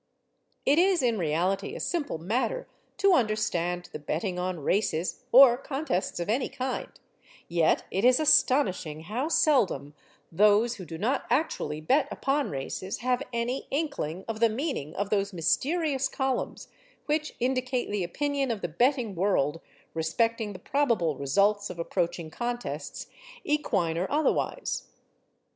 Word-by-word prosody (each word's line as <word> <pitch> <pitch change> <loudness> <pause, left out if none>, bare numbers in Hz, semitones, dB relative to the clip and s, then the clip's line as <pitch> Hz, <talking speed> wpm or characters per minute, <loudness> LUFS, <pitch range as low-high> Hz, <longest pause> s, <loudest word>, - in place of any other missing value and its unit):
It 290 +4 +4
is 370 -4 +3
in 230 -4 +1
reality 175 +4 0
a - - -5
simple 310 - -2
matter 240 - -1 0.3
to 395 -1 +4
understand 180 - 0
the - - -5
betting 180 +5 -2
on 180 -2 -3
races 180 - -1
(or 250 -1 +8
contests 270 - -2
of 175 - -3
any 240 +5 0
kind), 260 0 -3 0.6
yet 170 -2 +2
it 195 - -1
is 250 +2 +5
astonishing 190 - +3
how 225 - -3
seldom 275 - +2 0.4
those 210 +6 +4
who 185 - -8
do 165 0 -7
not 235 +10 0
actually 240 - -1
bet 265 - +2
upon 275 +1 0
races 140 +7 -4
have 250 +1 +1
any 240 +3 -2
inkling 275 - -3
of 225 -1 -4
the 230 0 +5
meaning 220 - -3
of 200 0 -2
those 200 -1 0
mysterious 275 - +1
columns 265 -2 -2 0.4
which 305 0 -1
indicate 255 -1 -1
the 205 -3 0
opinion 280 +8 -1
of 225 -4 -2
the - - -1
betting 240 - +1
world 165 -5 +1 0.3
respecting 215 +7 0
the - - -8
probable 225 - +1
results 200 +9 +1
of 180 - -7
approaching 170 -1 -2
contests, 240 +5 -4 0.4
equine 170 - 0
or 185 - -2
otherwise. 300 0 0
220 Hz, 140 wpm, -28 LUFS, 175-270 Hz, 0.6 s, or